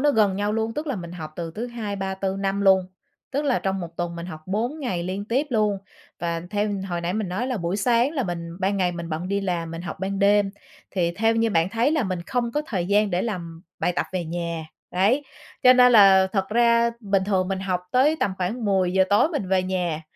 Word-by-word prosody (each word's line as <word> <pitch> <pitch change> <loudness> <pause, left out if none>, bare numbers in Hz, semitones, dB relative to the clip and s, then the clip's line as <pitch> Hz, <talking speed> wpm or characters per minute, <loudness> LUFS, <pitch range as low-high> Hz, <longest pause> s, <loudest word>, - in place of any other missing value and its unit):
nó 290 +1 +4
gần 210 -6 +3
nhau 205 +1 0
luôn, 225 +1 -1
tức 305 +1 -4
là 270 -6 -2
mình 170 -1 -7
học 155 -3 -7
từ 170 -1 -4
thứ 235 +3 -3
Hai, 220 -4 -5
Ba, 190 0 -3
Tư, 190 0 -2
Năm 195 0 -1
luôn, 190 -2 +4 0.4
tức 285 +2 -1
là 275 -3 +2
trong 190 0 -2
1 170 -1 -8
tuần 175 -1 -3
mình 170 +1 -6
học 155 -3 -8
4 235 +10 -2
ngày 185 -10 -2
liên 190 +3 -3
tiếp 260 +7 0
luôn 210 -4 +1 0.4
và 170 -1 -2
theo 210 0 0 0.2
hồi 175 -1 -2
nãy 170 +1 -2
mình 210 -3 -2
nói 205 +8 -2
là 255 -3 -1
buổi 175 +1 -2
sáng 235 +4 +2
là 275 - -1
mình 170 -4 -4
ban 200 +1 +1
ngày 180 -2 +1
mình 170 -1 -6
bận 165 +4 -3
đi 200 0 0
làm, 175 -4 -2
mình 165 +1 -6
học 175 - -5
ban 195 +1 -2
đêm, 205 0 +4 0.4
thì 175 -3 0
theo 225 +1 +2
như 225 0 +2
bạn 165 -2 +2
thấy 230 +6 +1
là 310 -5 +2
mình 185 -4 -2
không 240 -2 -1
có 295 - 0
thời 180 -5 -2
gian 205 +1 +3
để 180 0 0
làm 170 -6 -5 0.2
bài 180 - +1
tập - - 0
về 180 -2 -2
nhà. 170 -1 -4 0.3
Đấy, 215 +11 +2 0.4
cho 255 - +9
nên 250 -1 +6
là 195 -3 +7
thật 195 -2 0
ra 235 +1 +3
bình 195 -3 +1
thường 190 -2 +1
mình 190 -1 -1
học 185 -2 -1
tới 280 +5 +4
tầm 195 - +1
khoảng 215 +6 -2
10:00 190 -1 +3
tối 205 +9 +5
mình 295 - -3
về 190 -1 +2
nhà, 175 -4 -2
195 Hz, 245 wpm, -24 LUFS, 180-225 Hz, 0.4 s, cho